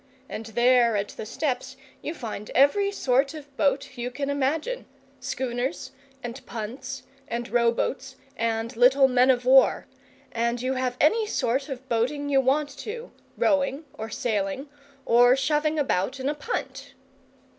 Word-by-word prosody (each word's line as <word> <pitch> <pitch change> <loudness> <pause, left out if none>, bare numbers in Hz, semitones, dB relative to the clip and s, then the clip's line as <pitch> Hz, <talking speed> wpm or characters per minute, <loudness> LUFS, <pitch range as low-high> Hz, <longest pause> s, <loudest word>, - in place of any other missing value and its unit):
And 225 +1 -6
there 240 0 +4
at 200 0 -2
the 215 - -8
steps 260 0 -3 0.2
you 315 - -4
find 215 -6 -6
every 395 +10 +4
sort 275 -4 +1
of 285 -2 -11
boat 280 -2 0
you 240 +1 -2
can 280 +2 -3
imagine 295 - -1 0.3
schooners, 260 +2 -3 0.3
and 240 +2 -6
punts, 255 +4 -6 0.2
and 235 -2 -3
row 235 -1 +3
boats, 270 +3 -3 0.2
and 230 0 -2
little 260 +3 +6
men 255 0 +4
of 250 -1 +3
war. 265 +1 +5 0.5
And 235 +1 -1
you 255 +2 -1
have 255 -1 -2
any 435 +9 +3
sort 270 - -1
of 265 -1 -7
boating 260 +5 0
you 270 -1 +4
want 285 +2 +1
to 465 +3 -6 0.3
rowing, 285 0 +1
or 220 +1 -6
sailing, 220 +4 -2 0.4
or 245 +2 +6
shoving 300 +3 +1
about 265 -3 0
in 265 +2 -1
a - - 0
punt!" 305 +11 -5
260 Hz, 150 wpm, -26 LUFS, 240-285 Hz, 0.5 s, little